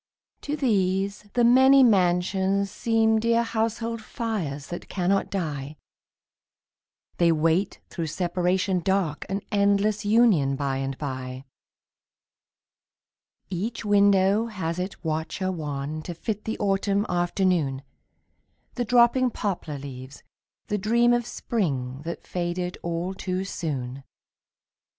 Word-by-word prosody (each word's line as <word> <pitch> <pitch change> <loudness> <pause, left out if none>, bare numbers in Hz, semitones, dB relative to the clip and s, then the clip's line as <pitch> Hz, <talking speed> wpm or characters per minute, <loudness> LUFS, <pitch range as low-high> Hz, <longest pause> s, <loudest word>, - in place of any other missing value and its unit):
To 295 - -3
these 200 -4 0
the 240 - +2
many 265 +3 +7
mansions 190 -1 +2
seem 225 -1 +2
Dear 230 +1 +2
household 230 0 -2
fires 190 -12 -4
that 175 - -7
cannot 195 +1 0
die; 150 -6 -4 1.4
They 170 -1 +4
wait 165 +4 +1
through 165 -2 -3
separation 180 +3 0
dark 175 -4 -1
An 195 +1 -2
endless 205 +1 +2
union 205 - +4
by 135 -1 -1
and 135 0 -3
by. 130 -2 -5 2.1
Each 210 +6 -3
window 200 +1 +4
has 180 -6 -3
its 185 +2 -5
watcher 160 +4 -2
wan 150 -2 -4
To 170 +2 -7
fit 210 +4 -4
the 220 - -3
autumn 200 0 +1
afternoon, 175 -6 0 0.9
The 245 - -2
dropping 245 +2 +4
poplar 185 -9 -3
leaves, 130 -1 -9 0.4
the 210 - -2
dream 235 +4 +3
Of 240 -1 0
spring 135 - -2
that 170 - -6
faded 180 0 -3
all 170 +2 -3
too 185 0 -3
soon. 140 -7 -4
190 Hz, 115 wpm, -25 LUFS, 160-215 Hz, 2.1 s, many